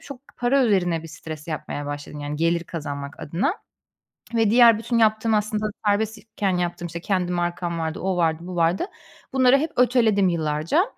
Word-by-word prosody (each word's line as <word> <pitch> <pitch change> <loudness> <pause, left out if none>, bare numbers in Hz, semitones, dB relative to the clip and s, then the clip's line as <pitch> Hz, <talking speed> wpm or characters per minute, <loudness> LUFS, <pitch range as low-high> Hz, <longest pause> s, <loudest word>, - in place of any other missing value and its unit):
çok 275 -3 -10 0.2
para 255 +2 +3
üzerine 180 -7 +1
bir - - -8
stres 155 0 -9
yapmaya 145 -2 -4
başladım 145 +1 -6
yani 145 +1 -4
gelir 170 +1 +1
kazanmak 140 -3 -6
adına. 200 - -1 0.8
Ve 225 -2 +3
diğer 230 -1 +7
bütün 230 +1 -1
yaptığım 220 0 +3
aslında 215 0 0 0.2
serbest 215 +2 +1
iken 200 -4 -2
yaptığım, 175 0 -2
işte, 170 0 -6
kendi 180 -1 -1
markam 175 -1 -2
vardı, 160 0 -3
o 190 -1 -1
vardı, 160 -2 +1
bu 180 -1 -6
vardı. 170 - +2 0.5
Bunları 260 0 +5
hep 310 +3 -2
öteledim 230 -6 +3
yıllarca. 160 - +1
180 Hz, 170 wpm, -23 LUFS, 165-225 Hz, 0.8 s, diğer